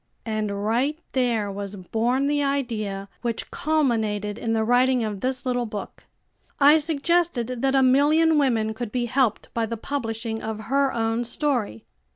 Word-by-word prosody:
And 215 -2 -2
right 255 +8 +1
there 235 -6 0
was 200 0 -5
born 230 +8 0
the 290 0 +1
idea 225 -8 -2
which 235 -2 -3
culminated 225 -9 0
in 225 - -1
the 220 -1 +1
writing 245 +1 +3
of 205 -3 -4
this 255 0 -2
little 245 -2 0
book. 210 -1 -7 0.5
I 295 +2 +7
suggested 295 -5 0
that 270 0 +2
a 265 - +5
million 300 +4 +4
women 225 -6 +1
could 225 -1 -5
be 245 0 -1
helped 250 -1 0
by 230 -1 0
the 230 - -4
publishing 225 -3 -4
of 220 0 -4
her 275 0 +3
own 225 +1 0
story. 240 - -2
240 Hz, 160 wpm, -24 LUFS, 220-275 Hz, 0.5 s, I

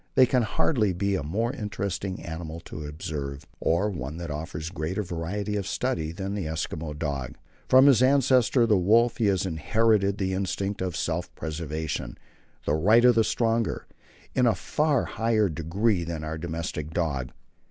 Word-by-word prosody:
There 130 - +7
can 125 0 +2
hardly 110 - +1
be 100 +3 0
a 95 - 0
more 110 - -1
interesting 100 -5 -4
animal 80 -1 -6
to 75 -1 -7
observe, 75 -2 -5
or 95 +6 +1
one 75 -3 -5
that 85 -2 -5
offers 80 +1 -5
greater 90 +4 -2
variety 95 +4 -3
of 100 -3 -2
study, 80 0 -1
than 95 +3 -4
the 100 -6 -3
Eskimo 80 -1 -4
dog. 70 -5 -3 0.3
From 130 +1 +7
his 135 -5 +6
ancestor 130 -2 +4
the 105 -4 +3
wolf 115 +7 +4
he 115 -4 +2
has 95 -1 +1
inherited 100 +4 +2
the 95 -1 -1
instinct 100 +1 -2
of 90 -3 -2
self 85 +1 -2
preservation 80 -5 -4 0.5
the 75 - +1
right 105 +10 +5
of 125 - +7
the 115 -1 +4
stronger 115 0 0 0.5
in 125 -1 +3
a 115 - +3
far 150 -4 +1
higher 110 -2 +1
degree 85 +5 0
than 85 -2 -4
our 80 +1 -4
domestic 80 -2 -4
dog. 70 -7 -1
95 Hz, 165 wpm, -26 LUFS, 80-110 Hz, 0.5 s, There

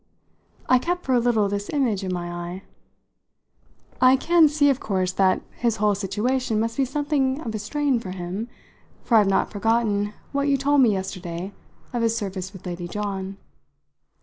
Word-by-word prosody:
I 255 - +5
kept 355 +6 -2
for 260 - +1
a 245 - +5
little 230 -4 +2
this 200 0 -3
image 235 -9 0
in 185 - -2
my 175 -1 -3
eye. 175 +2 -6 1.4
"I 255 +1 +7
can 330 +3 +5
see 285 -1 +3
of 265 - -2
course 185 -3 -1
that 185 0 +2
his 235 -2 +1
whole 210 -1 +2
situation 220 +4 -1
must 230 +1 -1
be 270 - +1
something 275 0 0
of 225 -6 -5
a 215 - -3
strain 275 +4 0
for 205 - -8
him; 185 +4 -4 0.6
for 230 - +4
I've 210 -2 +5
not 195 - +1
forgotten 210 -1 +1 0.2
what 280 0 0
you 280 -1 +3
told 280 +1 +3
me 240 -4 +5
yesterday 190 -1 -4 0.4
of 240 - -1
his 230 0 +1
service 190 -3 -4
with 190 - -13
Lady 175 -1 -5
John. 195 0 -4
215 Hz, 175 wpm, -24 LUFS, 190-260 Hz, 1.4 s, I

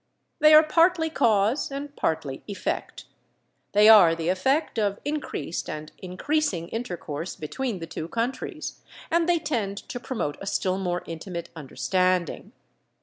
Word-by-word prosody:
They 305 0 +8
are 310 - +9
partly 330 +1 +3
cause 220 0 +2
and 280 +1 -6
partly 155 -4 -2
effect. 200 -2 -4 0.7
They 210 +1 +6
are 200 -7 +8
the 165 +1 -2
effect 240 - +1
of 200 -2 0
increased 290 - -3
and 155 0 -6
increasing 185 - -1
intercourse 175 -7 -5
between 225 - -4
the 165 - -6
two 160 0 -6
countries, 235 +7 -4 0.3
and 335 +1 +2
they 350 - +4
tend 230 -11 -2
to 245 - -6
promote 230 - -3
a 195 - -6
still 190 -1 0
more 180 -2 -2
intimate 170 +1 -6
understanding. 170 +5 -1
200 Hz, 140 wpm, -26 LUFS, 170-275 Hz, 0.7 s, are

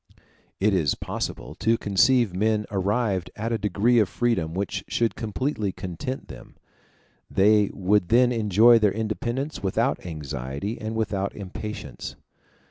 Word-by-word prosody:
It 105 +1 +3
is 80 -8 +2
possible - - -5
to 115 +1 +1
conceive 110 +1 +3
men 105 +2 +1
arrived 100 -1 0
at 110 +2 -3
a 115 - 0
degree 105 +4 +2
of 105 - +2
freedom 90 -10 0
which 100 0 -2
should 115 -1 0
completely 110 -1 -2
content 95 +9 -6
them; - - -12 0.7
they 105 +1 +4
would 95 -1 +1
then 125 +2 +5
enjoy 115 +1 +5
their 105 -2 +3
independence 120 +6 -3
without 95 -2 0
anxiety 75 - -5
and 110 +1 -4
without 100 -3 -1
impatience. 100 - -7
105 Hz, 130 wpm, -25 LUFS, 95-115 Hz, 0.7 s, then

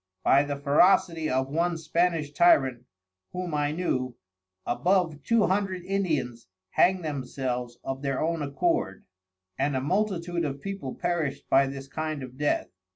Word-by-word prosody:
By 140 - +5
the 145 0 -2
ferocity 160 +3 +3
of 130 +1 +1
one 170 +3 0
Spanish 165 -1 0
Tyrant 130 -7 +4 0.5
(whom 180 -2 -4
I 145 0 +1
knew) 130 -7 -2 0.5
above 165 +4 +1
Two 230 +7 +3
Hundred 190 -2 -1
Indians 155 -12 -1 0.2
hang'd 185 -2 +3
themselves 125 -4 -3
of 135 0 -4
their 135 -2 -1
own 165 0 0
accord; 140 - -1 0.5
and 145 -1 +1
a - - +1
multitude 175 +2 -1
of 140 -2 -3
People 195 -7 -5
perished 170 -6 -2
by 135 +1 +5
this 135 0 -7
kind 155 0 -4
of 130 0 -9
Death. 145 +2 0
150 Hz, 145 wpm, -27 LUFS, 135-175 Hz, 0.5 s, By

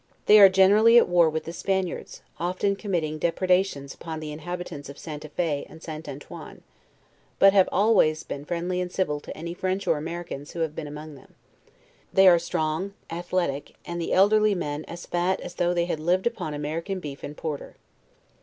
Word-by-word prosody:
They 215 - +8
are 195 -1 +10
generally 205 +5 +6
at 240 - +6
war 175 -2 +4
with 160 0 -3
the 165 - -7
Span 190 +2 0
iards, 175 - -8 0.2
often 185 +3 0
committing 165 -7 -2
depredations 180 -4 +1
upon 160 -1 -7
the 155 -1 -6
inhabitants 160 -2 -6
of 140 - -10
St. 150 -2 -7
a 155 - -9
Fe 150 -2 -1
and 160 - -14
St. 155 -1 -7
Antoine; 140 +1 -10 0.7
but 195 0 +6
have 195 -2 +5
always 195 -7 +3
been 140 - -6
friendly 175 +3 -2
and 180 -1 -4
civil 150 -7 -1
to - - -9
any 170 +2 -5
French 185 +2 -2
or 165 -4 +1
Americans 165 -3 -6
who 170 - -4
have 160 -2 -1
been 155 - -5
among 150 +1 -8
them. 140 - -17 0.8
They 190 0 +6
are 175 -2 +7
strong 170 +3 -2 0.2
athletic, 170 -4 -2
and 170 0 -4
the 165 - -3
elderly 210 +2 +4
men 150 -3 -4
as 170 0 -9
fat 175 +2 0
as 180 - -7
though 175 0 +1
they 170 -1 +1
had 170 -3 -3
lived 175 +4 +1
upon 195 -10 -2
American 165 +6 -3
beef 140 -5 -8
and 150 - -7
porter. 150 -3 -5
170 Hz, 190 wpm, -25 LUFS, 155-185 Hz, 0.8 s, are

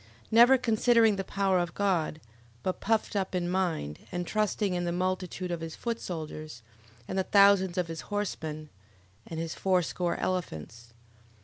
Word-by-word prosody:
Never 240 +4 +7
considering 230 -2 +4
the 195 - -2
power 195 -1 +1
of 175 -1 -3
God, 180 -6 0 0.4
but 185 - -2
puffed 220 -1 0
up 190 -2 -1
in 175 -1 0
mind, 175 - -1
and 175 0 -3
trusting 210 -1 0
in 175 0 -1
the 175 - -1
multitude 185 0 -2
of 170 -1 -3
his 165 -1 -6
foot 235 -1 -3
soldiers, 155 -6 -6 0.4
and 190 - -2
the - - +2
thousands 200 -2 +5
of 180 -2 0
his 165 -1 -6
horsemen, 160 -7 -3 0.6
and 160 - -5
his 165 -1 -3
fourscore 180 -2 0
elephants. 115 - -4
185 Hz, 155 wpm, -29 LUFS, 165-200 Hz, 0.6 s, Never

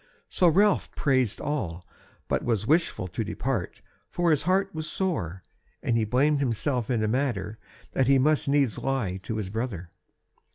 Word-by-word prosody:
So 180 - +3
Ralph 200 +5 +3
praised 130 -6 +1
all, 90 - -3 0.4
but - - 0
was 110 -3 0
wishful 155 - +1
to 110 +6 -3
depart, 110 -1 -3 0.3
for 175 -1 +1
his 150 - +3
heart 195 +2 +1
was 155 -1 -4
sore, 95 - -2 0.4
and 120 - +1
he 115 -1 +2
blamed 140 +6 +2
himself 125 -1 0
in 115 -4 +1
a - - +1
manner 110 -4 -1 0.3
that 130 - +1
he 135 0 +5
must 145 +1 +2
needs 140 -5 +2
lie 120 -9 -1
to 110 - -4
his 100 -3 -4
brother. 105 -7 -4
130 Hz, 165 wpm, -27 LUFS, 105-150 Hz, 0.4 s, he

